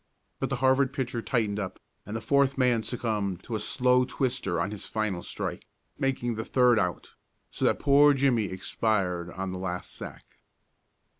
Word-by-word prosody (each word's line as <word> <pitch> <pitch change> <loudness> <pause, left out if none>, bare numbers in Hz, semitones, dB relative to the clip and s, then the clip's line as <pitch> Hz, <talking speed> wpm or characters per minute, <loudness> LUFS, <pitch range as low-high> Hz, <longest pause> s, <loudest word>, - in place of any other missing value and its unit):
But - - -1
the 135 - 0
Harvard 130 +1 +3
pitcher 125 -4 -2
tightened 110 -4 0
up, 100 -3 -5 0.3
and 105 - -5
the 115 - -3
fourth 140 +2 +2
man 125 -3 +3
succumbed 105 -6 -2
to 120 - -7
a - - -1
slow 125 +3 +3
twister 125 -8 -1
on 100 +4 -1
his 105 - -7
final 110 -5 -2
strike, - - -5 0.3
making 130 -3 0
the 110 0 -3
third 125 -2 +4
out, 90 -4 -2 0.4
so - - -2
that - - +3
poor 145 0 +5
Jimmie 130 -5 +2
expired 95 -2 -1
on 95 +2 -4
the 95 - -5
last 90 -1 -4
sack. - - -11
115 Hz, 170 wpm, -28 LUFS, 100-130 Hz, 0.4 s, poor